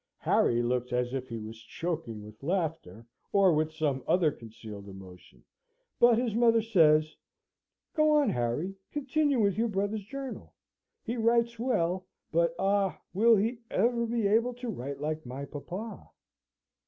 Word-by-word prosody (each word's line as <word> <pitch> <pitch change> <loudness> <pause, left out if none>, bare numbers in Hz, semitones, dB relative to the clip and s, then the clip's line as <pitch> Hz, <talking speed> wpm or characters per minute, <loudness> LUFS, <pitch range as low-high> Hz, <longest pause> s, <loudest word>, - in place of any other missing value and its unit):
Harry 120 0 +2
looks 125 +1 -1
as 125 0 0
if 130 -1 -3
he 115 - -4
was 110 +1 -8
choking 125 -4 -4
with 105 0 -14
laughter, 150 - -3 0.3
or 195 -3 +5
with 155 +1 +1
some 150 -5 -1
other 170 -4 +3
concealed 110 -4 -10
emotion, 95 -2 -13 0.6
but 240 -1 +6
his 240 -2 0
mother 230 0 +4
says, 155 -8 +3 0.8
"Go 305 -1 +4
on, 295 -2 +4
Harry! 125 +10 -1 0.2
Continue 290 -1 +1
with 200 -2 +2
your 235 - +2
brother's 205 0 -2
journal. 270 +5 -7 0.5
He 235 +1 -3
writes 235 0 +2
well: 185 -7 0 0.2
but, 170 0 +2
ah, 195 -1 +1
will 225 +4 +5
he 225 +4 0
ever 235 +3 +1
be 230 -2 0
able 230 +4 +2
to 245 0 -6
write 140 - -5
like 155 +1 -3
my 130 +3 -6
papa?" 180 +10 -7
180 Hz, 150 wpm, -29 LUFS, -, 0.8 s, but